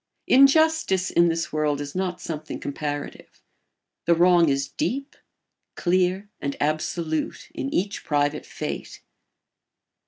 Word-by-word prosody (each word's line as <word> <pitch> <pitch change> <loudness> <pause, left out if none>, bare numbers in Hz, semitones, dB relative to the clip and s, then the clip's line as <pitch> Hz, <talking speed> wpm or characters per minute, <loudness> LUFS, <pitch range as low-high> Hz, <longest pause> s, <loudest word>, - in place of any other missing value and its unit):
Injustice 275 - +4
in 170 0 +4
this 165 -1 -2
world 150 -2 0
is 145 0 -5
not 185 -1 -2
something 155 -1 -6
comparative; 145 0 -5 0.7
the 170 - +5
wrong 175 -1 +5
is 135 0 0
deep, 275 - -3 0.6
clear, 185 +2 +1
and 140 0 -3
absolute 155 +1 -2
in 135 - -4
each 200 +3 -1
private 145 0 0
fate. - - -6
170 Hz, 115 wpm, -24 LUFS, 145-190 Hz, 0.7 s, the